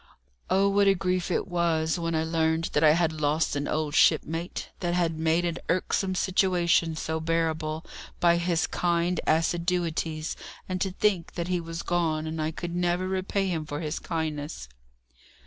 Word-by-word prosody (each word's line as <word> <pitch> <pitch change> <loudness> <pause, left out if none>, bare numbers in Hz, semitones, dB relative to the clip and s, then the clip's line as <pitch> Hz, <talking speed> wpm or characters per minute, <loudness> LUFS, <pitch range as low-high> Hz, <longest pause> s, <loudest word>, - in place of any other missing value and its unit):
Oh, 195 +1 +3
what 200 0 +3
a 195 - +5
grief 180 0 -1
it 180 - 0
was 170 -2 0
when 165 -1 -1
I 160 - +1
learned 160 0 0
that 150 - +2
I 155 -1 +7
had 160 -2 0
lost 150 +1 +1
an 145 0 -2
old 155 -1 -1
shipmate, 165 +2 +2
that 175 -1 -1
had 165 -3 0
made 165 +2 +2
an 170 -1 -2
irksome 185 +1 0
situation 175 -3 +2
so 160 0 -2
bearable 160 -1 -1 0.3
by 170 -1 +4
his 170 -1 +1
kind 175 0 0
assiduities, 165 -1 0 0.3
and 185 -1 -3
to 195 - +1
think 190 -2 0
that 170 0 -3
he 180 -1 +1
was 165 0 -6
gone, 160 -3 0
and 160 0 -3
I 155 - 0
could 170 +2 -5
never 175 +1 0
repay 190 +1 -1
him 165 -3 -1
for 145 -1 -5
his 155 -1 -3
kindness! 155 - -4
170 Hz, 170 wpm, -27 LUFS, 160-180 Hz, 0.3 s, I